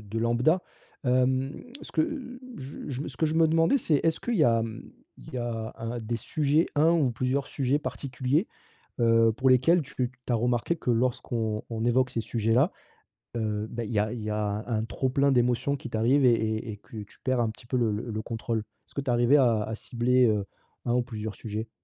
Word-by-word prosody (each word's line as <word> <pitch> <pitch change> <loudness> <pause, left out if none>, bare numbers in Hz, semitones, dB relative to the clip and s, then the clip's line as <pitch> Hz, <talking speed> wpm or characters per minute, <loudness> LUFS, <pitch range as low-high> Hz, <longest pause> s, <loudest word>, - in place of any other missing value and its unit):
de 105 +2 -5
lambda. 120 +10 +2 0.4
Hem, 130 +2 +2 0.3
ce - - -10
que 295 -6 -2 0.2
j 135 +1 -8
j 135 0 -3
ce - - -8
que 160 - +2
je 155 - -1
me 165 0 +5
demandais 165 - +4
c'est, 150 - +2
est-ce 165 -1 +2
qu'il 240 -2 -1
y 155 - +4
a, 115 -1 +3
mmh, 110 -1 -7 0.3
il - - -12
y - - -1
a 115 -2 -3
1 115 +1 -4
des 115 +1 -3
sujets 150 +6 +1
un 160 +3 +4
ou 150 -7 +3
plusieurs 130 +4 -1
sujets 135 +1 0
particuliers, 140 - -1 0.5
heu, 115 -1 +5
pour 130 +2 +2
lesquels 145 +7 +5
tu 140 0 -12 0.3
tu 120 - 0
as - - +4
remarqué 120 +7 +1
que 125 -7 -1
lorsqu'on 115 -2 -1
on 115 0 -2
évoque 130 +2 +3
ces - - -2
sujets-là, 115 - +2 0.7
heu, 105 -1 -2
bah, 115 -1 -3
il 105 - -6
y 105 - +2
a 110 +2 0
il 120 - -5
y 110 - -3
a 105 0 -1
un 110 -2 0
trop 130 - -2
plein 140 +1 +3
d'émotions 125 +3 +2
qui 125 - -8
t'arrive 125 +5 +3
et 120 - +6
et 110 0 -1
et - - -9
que 110 - -13
tu - - -19
perds 130 -1 +1
un 115 - +1
petit 115 +2 -11
peu 130 - 0
le 115 -3 +2
le 110 0 -3
contrôle? 115 0 -3 0.3
Est-ce - - -20
que 140 - -1
tu 135 - -4
es - - +3
arrivée 120 +4 +5
à 115 -5 +2
cibler, 125 +2 +2
heu, 105 -2 +1 0.4
1 120 - +1
ou 125 - +2
plusieurs 110 -4 -6
sujets? 110 +1 -5
120 Hz, 220 wpm, -27 LUFS, 115-135 Hz, 0.7 s, et